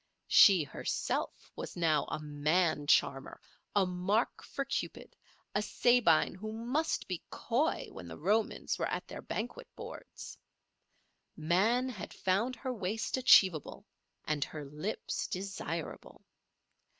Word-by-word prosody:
She 190 -6 +7
herself 135 - -3
was - - -6
now 160 -4 +2
a - - -4
man 150 +1 +1
charmer, 135 -1 +2 0.4
a 200 -2 +4
mark 185 +5 0
for 275 - -4
Cupid, 275 - -4 0.4
a 205 - +1
Sabine 240 -7 +3
who 215 +4 -6
must 250 +9 -1
be 180 -3 -3
coy 265 +8 0
when 90 - -9
the 80 - -8
Romans 210 +6 0
were - - 0
at - - -4
their - - -7
banquet 245 - -5
boards. - - -9 1.0
Man 200 +11 +2
had 225 -8 -7
found 205 +7 0
her 255 +2 -4
waist 215 0 -2
achievable 190 - +4 0.4
and 150 -2 0
her 150 0 -7
lips 150 +10 -4
desirable. 185 -4 -5
190 Hz, 125 wpm, -32 LUFS, 155-230 Hz, 1.0 s, She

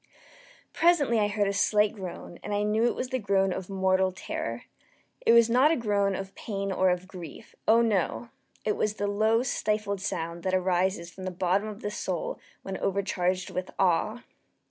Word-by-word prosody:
Presently 305 -9 +3
I 205 - +3
heard 205 -1 0
a 200 - 0
slight 210 +1 +3
groan, 180 -3 -8
and 210 - -3
I 205 - +1
knew 215 +2 +2
it 240 - +1
was 255 - -3
the 260 -1 -1
groan 195 -3 +2
of 190 0 -6
mortal 190 -1 +2
terror. 120 -10 -5 0.6
It - - +8
was 235 -1 +7
not 250 +5 +5
a 325 - +3
groan 205 -5 +1
of 195 0 -6
pain 195 -2 -4
or 190 0 +3
of 180 +1 -1
grief 180 +2 -10
oh, 230 +2 +6
no! 220 +2 0 0.4
it 210 - +1
was 210 0 0
the 205 - -2
low 220 +3 +2
stifled 210 -5 -1
sound 170 -3 -3
that 185 +1 0
arises 185 -1 0
from 190 +2 -9
the - - -1
bottom 185 +3 0
of 215 +1 -8
the 205 - -3
soul - - -3 0.2
when 195 -1 -4
overcharged 185 -2 -1
with 185 0 -4
awe. 195 +6 +1
200 Hz, 190 wpm, -28 LUFS, 185-215 Hz, 0.6 s, It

